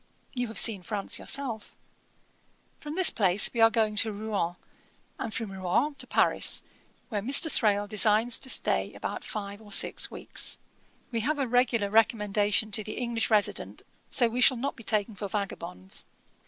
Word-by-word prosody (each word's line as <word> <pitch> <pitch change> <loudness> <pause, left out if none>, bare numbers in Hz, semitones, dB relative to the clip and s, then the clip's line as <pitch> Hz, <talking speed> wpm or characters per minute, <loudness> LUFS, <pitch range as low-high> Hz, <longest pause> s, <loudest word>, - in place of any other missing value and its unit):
You 245 -2 -2
have 220 - -9
seen 215 -5 +4
France 200 +1 -1
yourself. 250 -6 -1 1.0
From 300 +1 -7
this 370 -2 +5
place 195 -1 +4
we 235 - -4
are 225 - +7
going 220 -2 0
to 220 +1 +3
Rouen, 205 -4 -3 0.6
and 225 - -4
from 220 -2 -4
Rouen 190 +10 -1
to - - -5
Paris, - - +1 0.5
where 210 -5 -3
Mr. 280 +7 +2
Thrale 205 -3 +1
designs 215 +3 +3
to 260 - -3
stay - - +2
about - - -6
five 205 0 -6
or 210 -2 -15
six - - +4
weeks. - - -1 0.5
We 230 - -2
have 290 +7 -1
a 275 -2 -1
regular 235 -4 +1
recommendation 210 -1 +1
to 215 +1 0
the 215 - -7
English 235 -2 -2
resident, 210 -2 -1 0.3
so 240 - +2
we 240 +2 -3
shall 255 0 +5
not 270 +4 -3
be - - -13
taken 215 0 -1
for 200 +1 -6
vagabonds. 95 - -5
220 Hz, 170 wpm, -27 LUFS, 205-240 Hz, 1.0 s, are